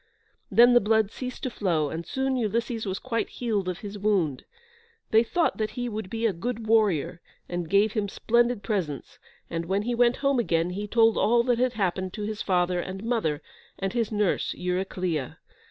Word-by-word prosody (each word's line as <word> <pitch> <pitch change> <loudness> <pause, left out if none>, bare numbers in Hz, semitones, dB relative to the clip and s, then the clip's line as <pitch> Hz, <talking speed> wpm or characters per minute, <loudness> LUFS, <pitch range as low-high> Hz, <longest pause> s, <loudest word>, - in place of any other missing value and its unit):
Then 240 +1 +6
the 240 - +7
blood 220 0 +2
ceased 255 -1 -7
to 255 - -2
flow, 165 -9 0
and 165 +1 -5
soon 265 0 -1
Ulysses 230 -1 -1
was 190 0 -2
quite 230 -1 -2
healed 210 -6 -2
of 180 - -5
his 205 0 -7
wound. 190 -10 0 0.7
They 220 - +6
thought 330 +8 0
that 215 -1 -1
he 245 0 -1
would 215 -4 -5
be 225 +2 -2
a 220 - +2
good 230 +5 -4
warrior, 200 -7 +2 0.3
and 175 -2 -4
gave 200 +3 +3
him 210 -3 -1
splendid 235 0 +1
presents, 180 - -3 0.3
and 165 0 -4
when 195 +3 0
he 240 +2 -1
went 240 +1 +3
home 275 -2 +1
again 170 -6 +1
he 205 +3 -4
told 225 +1 +4
all 235 +1 +4
that 240 -1 +1
had 250 0 +2
happened 185 -3 -1
to 210 - -5
his 210 0 -4
father 180 -1 +1
and 190 +3 -5
mother, 220 -11 -1 0.3
and 195 +1 -3
his 230 -3 0
nurse, 210 -3 0
Eurycleia. 180 -5 -2
210 Hz, 190 wpm, -26 LUFS, 185-235 Hz, 0.7 s, the